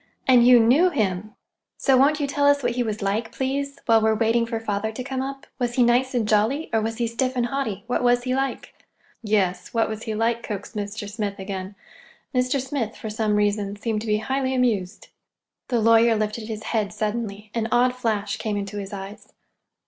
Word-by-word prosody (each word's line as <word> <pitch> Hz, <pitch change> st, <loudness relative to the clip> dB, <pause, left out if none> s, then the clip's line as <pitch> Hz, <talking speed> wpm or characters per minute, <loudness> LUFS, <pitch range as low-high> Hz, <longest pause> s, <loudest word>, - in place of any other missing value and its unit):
And 245 Hz, -2 st, +6 dB
you 250 Hz, -1 st, +8 dB
knew 265 Hz, +11 st, +5 dB
him. 210 Hz, -, -2 dB, 0.4 s
So 270 Hz, -, +3 dB
won't 285 Hz, +4 st, +4 dB
you 290 Hz, -, 0 dB
tell 285 Hz, +1 st, +1 dB
us 285 Hz, -1 st, +4 dB
what 245 Hz, -, +1 dB
he 245 Hz, +1 st, -1 dB
was 215 Hz, -3 st, -2 dB
like, 215 Hz, +3 st, -1 dB
please, 280 Hz, +1 st, -2 dB
while 225 Hz, -1 st, +5 dB
we're 220 Hz, 0 st, +3 dB
waiting 230 Hz, +1 st, +2 dB
for 230 Hz, -1 st, -2 dB
father 220 Hz, 0 st, -2 dB
to 250 Hz, +3 st, -6 dB
come 265 Hz, 0 st, -3 dB
up? 270 Hz, +1 st, -6 dB
Was 240 Hz, -1 st, -1 dB
he 250 Hz, -, +4 dB
nice 250 Hz, +2 st, +2 dB
and 230 Hz, -3 st, +1 dB
jolly, 220 Hz, +9 st, +1 dB
or 225 Hz, -, +3 dB
was 225 Hz, +1 st, -3 dB
he 240 Hz, -, 0 dB
stiff 255 Hz, +3 st, -1 dB
and 245 Hz, -1 st, +1 dB
haughty? 240 Hz, -6 st, -3 dB
What 245 Hz, -, -1 dB
was 245 Hz, 0 st, +3 dB
he 255 Hz, 0 st, -1 dB
like?" 270 Hz, +1 st, -2 dB, 0.5 s
"Yes, 205 Hz, -3 st, 0 dB
what 225 Hz, -, +3 dB
was 220 Hz, 0 st, -5 dB
he 220 Hz, -1 st, -4 dB
like?" 230 Hz, +1 st, 0 dB
coaxed 210 Hz, 0 st, -6 dB
Mr. 205 Hz, 0 st, -4 dB
Smith 205 Hz, -1 st, -4 dB
again. 190 Hz, 0 st, -6 dB, 0.6 s
Mr. 255 Hz, +2 st, +1 dB
Smith, 260 Hz, -4 st, -3 dB
for 220 Hz, -, -6 dB
some 215 Hz, -1 st, 0 dB
reason, 205 Hz, -1 st, 0 dB
seemed 215 Hz, 0 st, -2 dB
to 225 Hz, -, -6 dB
be 210 Hz, 0 st, +2 dB
highly 265 Hz, +4 st, -1 dB
amused. 215 Hz, -7 st, -1 dB, 0.6 s
The 240 Hz, -2 st, +1 dB
lawyer 230 Hz, +1 st, +5 dB
lifted 215 Hz, +1 st, -2 dB
his 220 Hz, -1 st, -5 dB
head 210 Hz, -3 st, 0 dB
suddenly. 210 Hz, -1 st, -4 dB
An 225 Hz, -1 st, -1 dB
odd 250 Hz, +1 st, +3 dB
flash 215 Hz, -4 st, -1 dB
came 205 Hz, -2 st, -2 dB
to 200 Hz, +1 st, -7 dB
his 195 Hz, -1 st, -7 dB
eyes. 195 Hz, +1 st, -8 dB
225 Hz, 210 wpm, -24 LUFS, 210-250 Hz, 0.6 s, you